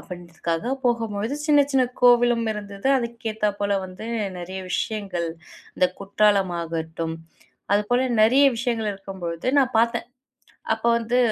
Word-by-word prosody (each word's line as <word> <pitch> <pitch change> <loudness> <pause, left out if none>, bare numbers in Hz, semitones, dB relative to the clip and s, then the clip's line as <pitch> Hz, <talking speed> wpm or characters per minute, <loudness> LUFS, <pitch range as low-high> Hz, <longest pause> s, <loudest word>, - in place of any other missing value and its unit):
அப்டின்றதுக்காக 170 +1 -5 0.2
போகும்பொழுது 225 -1 0
சின்ன 295 -2 +5
சின்ன 265 -1 +4 0.2
கோவிலும் 240 -1 +5
இருந்தது. 205 +2 -4
அதுக்கு 235 -2 -4
ஏத்தாப்போல 205 -1 -1
வந்து 185 +4 -9 0.3
நெறைய 185 +2 -6
விஷயங்கள். 195 -5 -2 0.5
இந்த 180 - +3
குற்றாலம் 200 -1 +2
ஆகட்டும் 165 0 -4 0.6
அதுப்போல 245 +5 +2 0.2
நெறைய 260 +6 +6
விஷயங்கள் 230 -2 -1
இருக்கும்பொழுது 190 -1 -5
நான் 260 -2 +2
பார்த்தேன். 235 +1 +1 0.7
அப்ப 220 - -15
வந்து 235 +2 0
210 Hz, 115 wpm, -23 LUFS, 185-235 Hz, 0.7 s, நெறைய